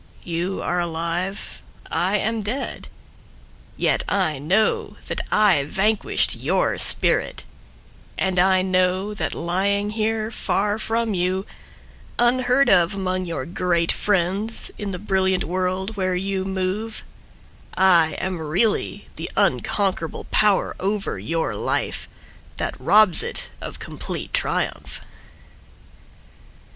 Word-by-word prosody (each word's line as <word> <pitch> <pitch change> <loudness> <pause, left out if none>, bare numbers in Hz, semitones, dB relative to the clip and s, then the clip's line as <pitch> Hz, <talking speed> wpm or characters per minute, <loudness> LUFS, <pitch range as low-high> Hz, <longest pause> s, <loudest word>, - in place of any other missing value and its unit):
You 175 +2 -3
are 175 - 0
alive, 170 +3 -2 0.3
I 190 +4 +2
am 220 +2 -1
dead. 240 +7 -3 0.9
Yet - - +2
I 180 -8 +1
know 190 +10 +1
that - - -2
I 200 -9 +4
vanquished 210 +6 +1
your - - 0
spirit; - - +2 0.7
And 190 -2 +1
I 185 0 +4
know 185 +2 +1
that 210 - -3
lying 200 +4 0
here 220 0 -1
far 205 -1 -1
from 225 0 -1
you, 185 +1 0 0.7
Unheard 250 +2 +4
of 180 +1 +4
among 185 -1 -1
your 165 -7 -4
great 170 -1 +1
friends 200 +3 0
In 205 - -3
the 185 - -3
brilliant 190 -1 +1
world 185 +4 -2
where 185 -1 0
you 190 +1 -2
move, 195 +4 -3 0.7
I 175 -4 +5
am 185 -2 -3
really 175 +9 0
the - - -4
unconquerable 190 -5 0
power 210 -2 +2
over 200 +1 -2
your 165 0 -2
life - - -2 0.5
That - - -2
robs 210 -5 +5
it - - -4
of - - -6
complete - - -6
triumph. - - -2
190 Hz, 115 wpm, -22 LUFS, 180-210 Hz, 0.9 s, I